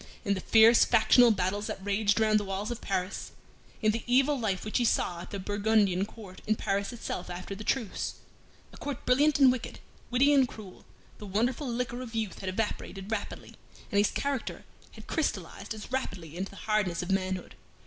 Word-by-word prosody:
In 200 - +2
the 190 - -3
fierce 225 +3 +6
factional 235 +2 +5
battles 205 0 0
that - - -4
raged 205 +1 +2
around 215 -1 +4
the - - -3
walls 200 +3 -3
of 240 - -5
Paris; 190 -1 -3 0.5
in 215 - +5
the 225 +1 -3
evil 270 +4 +4
life 200 -5 -1
which 215 - 0
he - - +2
saw 175 -6 +1
at - - -9
the 200 - -5
Burgundian 205 -1 +1
court 200 -5 -12
in 215 - +3
Paris 200 +1 -1
itself 230 -6 -5
after 180 +2 -6
the 205 +2 -7
truce 225 -4 -2 0.6
a - - -12
court 285 -4 -5
brilliant 290 +4 +4
and 270 -3 +7
wicked, 250 -2 -5 0.3
witty 270 +4 +4
and 270 -3 +5
cruel 205 -6 -12 0.3
the 210 - -8
wonderful 235 +8 0
liquor 245 0 -3
of 235 -3 -8
youth 220 -3 -2
had 190 - -4
evaporated 195 0 -4
rapidly, 220 -2 -4 0.4
and 200 - +3
his 205 - +4
character 280 -3 -3 0.3
had - - -12
crystallized - - -3
as 220 +2 -6
rapidly 185 - -4
into 190 +2 -3
the 195 - -13
hardness 205 -5 +1
of 180 - -3
manhood. 190 -1 -1
215 Hz, 190 wpm, -29 LUFS, 195-240 Hz, 0.6 s, and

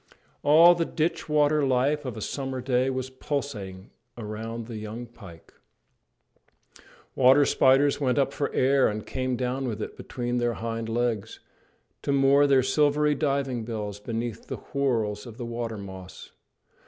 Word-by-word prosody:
All 160 +4 +7
the 170 -1 0
ditch 165 0 -2
water 150 0 +3
life 135 +3 +1
of 125 -3 -5
a - - -6
summer 135 +2 -4
day 125 +1 +1
was 130 0 -3
pulsating 110 -9 -5 0.3
around 115 +1 -6
the 115 -1 -7
young 110 +3 -6
pike. 95 -8 -15 1.6
Water 135 +3 +6
spiders 135 +3 +3
went 130 -1 +1
up 140 0 +1
for 140 - -2
air 135 +1 +3
and 105 0 -4
came 130 -1 -2
down 130 +2 -2
with 110 -5 -4
it - - -5
between 120 0 -4
their 120 0 0
hind 115 0 -4
legs, 115 -2 -2 0.6
to - - -2
moor 140 +1 +4
their 135 -2 +4
silvery 150 +2 +2
diving 135 -4 -1
bells 105 -3 -5
beneath 115 +1 -5
the - - -5 0.2
whorls 115 -6 0
of 115 -1 -11
the 120 - -5
water 115 -1 -4
moss. 95 -2 -10
125 Hz, 155 wpm, -26 LUFS, 115-140 Hz, 1.6 s, All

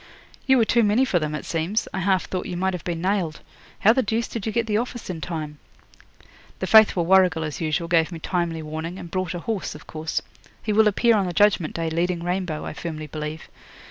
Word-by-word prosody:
'You 265 0 +6
were 230 - +4
too 235 +2 +3
many 220 +4 +3
for 180 -8 +1
them, 150 -1 -2
it - - -6
seems. 170 +7 -1
I - - -2
half 190 0 +1
thought 185 -1 -4
you 175 - -4
might 190 +1 0
have 180 - -5
been 170 -1 -3
nailed. 185 -5 -1 0.4
How 220 +1 +6
the 260 - +2
deuce 225 0 -1
did 225 -2 -5
you - - 0
get 230 +1 0
the 210 -2 0
office 240 -4 -5
in 165 -3 -6
time?' 155 -3 -5 1.0
'The - - -3
faithful 215 -6 +6
Warrigal, 180 -3 +4
as 155 0 -5
usual, 160 +1 -1
gave 165 0 +2
me 170 - -5
timely 165 -1 -2
warning, 160 +3 -5
and 170 - -9
brought 185 -2 -2
a - - -3
horse, 210 -3 -3
of 150 - -12
course. 160 +1 -3 0.4
He 215 - 0
will 220 +1 +5
appear 230 +3 +3
on 200 -3 +1
the 175 - -3
Judgment 195 -3 +3
Day 165 -1 -2
leading 170 +1 -1
Rainbow, 180 -3 -2
I - - -5
firmly 155 -1 -5
believe. 150 +1 -6
180 Hz, 230 wpm, -24 LUFS, 160-210 Hz, 1.0 s, You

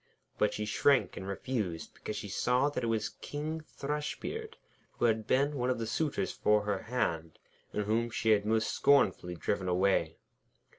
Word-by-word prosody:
But 105 - +3
she 105 - -3
shrank 135 +5 +3
and 95 - -6
refused, 100 -4 -3
because 110 - -6
she 105 0 -5
saw 125 +7 +2
that 135 - -3
it - - 0
was 110 -1 0
King 155 +2 -4
Thrushbeard, 155 - -4 0.4
who - - 0
had 110 -1 +1
been 140 +5 +3
one 125 -1 0
of 130 - +1
the 115 - -2
suitors 150 +6 -1
for 105 0 +2
her 105 -2 -1
hand, 85 -9 -2 0.3
and 105 - -1
whom 115 +3 +1
she 110 -1 +1
had 105 -1 +4
most 110 +1 +1
scornfully 95 -10 +3
driven 95 +2 -2
away. 95 +2 +2
110 Hz, 170 wpm, -31 LUFS, 105-135 Hz, 0.4 s, had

